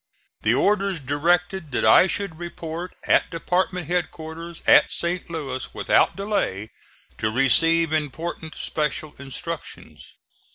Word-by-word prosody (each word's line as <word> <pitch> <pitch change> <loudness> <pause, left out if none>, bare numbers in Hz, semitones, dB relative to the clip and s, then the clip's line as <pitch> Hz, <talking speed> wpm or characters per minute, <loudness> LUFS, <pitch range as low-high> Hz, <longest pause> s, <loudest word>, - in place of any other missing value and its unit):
The - - +3
orders 200 -3 +1
directed 170 +4 0
that - - +1
I 110 +11 +7
should 195 -5 -2
report 170 0 -6
at - - +3
department 180 +1 -1
headquarters 165 0 -4
at - - +6
St. 175 +1 -2
Louis 135 -6 -4
without - - +3
delay, 195 - -2 0.5
to 110 - +1
receive 165 +6 +3
important 160 +2 -3
special 150 0 -3
instructions. 150 +4 -8
165 Hz, 115 wpm, -23 LUFS, 150-180 Hz, 0.5 s, I